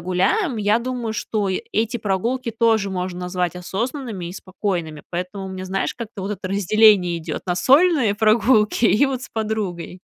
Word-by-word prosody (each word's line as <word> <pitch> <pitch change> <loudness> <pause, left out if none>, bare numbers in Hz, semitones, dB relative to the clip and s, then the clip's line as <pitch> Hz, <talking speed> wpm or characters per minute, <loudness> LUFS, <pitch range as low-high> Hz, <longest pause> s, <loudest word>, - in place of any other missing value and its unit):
гуляем, 195 - +1
я 210 +2 +2
думаю, 240 -2 -3
что 210 -1 -2
и 190 - -2
эти 225 +2 0
прогулки 230 +4 -2
тоже 225 -4 +2
можно 180 -1 -4
назвать 180 -1 -2
осознанными 220 - -4
и 175 - -6
спокойными, 180 -5 -4
поэтому 185 +2 -4
мне, 185 0 -6
знаешь, 195 +1 -2
как-то 225 -4 -7
вот 195 - -3
это 195 -2 -5
разделение 200 -2 +4
идет 160 - -5
на 180 0 0
сольные 270 - +4
прогулки 220 +1 +3
и 225 +4 +5
вот 265 -2 -2
с - - -8
подругой. 210 -5 -3
205 Hz, 165 wpm, -21 LUFS, 185-230 Hz, -, и